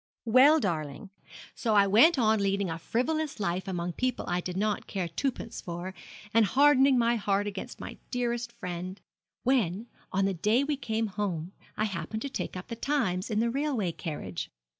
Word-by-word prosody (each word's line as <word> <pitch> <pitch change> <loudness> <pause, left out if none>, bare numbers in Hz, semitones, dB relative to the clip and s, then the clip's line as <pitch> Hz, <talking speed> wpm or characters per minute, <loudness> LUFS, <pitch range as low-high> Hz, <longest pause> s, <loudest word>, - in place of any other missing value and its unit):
'Well, 260 +7 +6
darling, 165 - -3 0.4
so 225 -3 0
I 200 -1 +6
went 235 - +6
on 220 -3 +3
leading 195 -2 0
a 165 - -4
frivolous 290 - -1
life 185 0 -1
among 175 -2 -2
people 255 +3 -1
I 175 0 0
did 180 0 -5
not 210 +1 -1
care 190 -4 -2
twopence 230 +5 -3
for, 175 +2 -5 0.4
and 230 +1 +6
hardening 270 +3 +5
my 235 0 +3
heart 200 -1 +1
against 200 -2 -6
my - - -8
dearest 240 -1 -1
friend, 185 -3 -6 0.4
when, 225 -6 +1 0.3
on 195 +1 +2
the 195 - +1
day 210 +9 +2
we 295 +1 0
came 225 -4 -1
home, 190 -5 -3 0.3
I 215 - +1
happened 195 +2 -4
to 280 - -3
take 260 - -4
up 180 - -8
the 230 - -4
Times 225 -8 0
in 215 -1 +1
the 235 0 +1
railway 265 - 0
carriage. 95 - -5
210 Hz, 180 wpm, -29 LUFS, 180-245 Hz, 0.4 s, Well